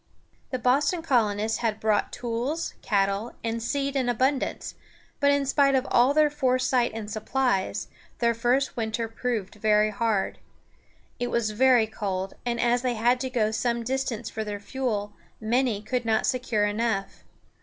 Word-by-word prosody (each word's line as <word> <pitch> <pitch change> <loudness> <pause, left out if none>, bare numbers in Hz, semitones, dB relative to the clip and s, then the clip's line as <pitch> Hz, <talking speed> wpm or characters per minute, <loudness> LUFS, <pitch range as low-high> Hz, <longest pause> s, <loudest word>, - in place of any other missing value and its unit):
The 255 - -2
Boston 285 +8 +1
colonists 220 -6 +1
had 220 -3 -1
brought 215 -1 +1
tools, 245 +7 -3
cattle, 200 +2 0
and 230 0 -2
seed 275 +3 -1
in 255 -3 +1
abundance; 260 +3 0 0.5
but 285 - +4
in 285 0 +2
spite 275 0 +3
of 260 0 +1
all 245 +3 +5
their 300 0 +4
foresight 255 -3 +1
and 220 -2 -5
supplies, 215 -1 -1 0.3
their 235 0 +2
first 245 +4 +1
winter 225 0 -2
proved 225 -3 -3
very 215 0 +3
hard. 210 -2 -1 0.8
It 245 - -1
was 235 -3 0
very 245 +1 +4
cold, 195 -3 -4
and 235 -1 -1
as 240 +1 +2
they 250 -2 -1
had 240 +3 +2
to 260 0 -3
go 220 -4 +1
some 235 +1 -1
distance 250 -2 -2
for 220 - -4
their 205 -1 -5
fuel, 210 -2 -3 0.3
many 225 -1 0
could 250 +2 -1
not 220 -1 +1
secure 240 -4 +1
enough. 205 -1 -2
235 Hz, 155 wpm, -26 LUFS, 215-255 Hz, 0.8 s, all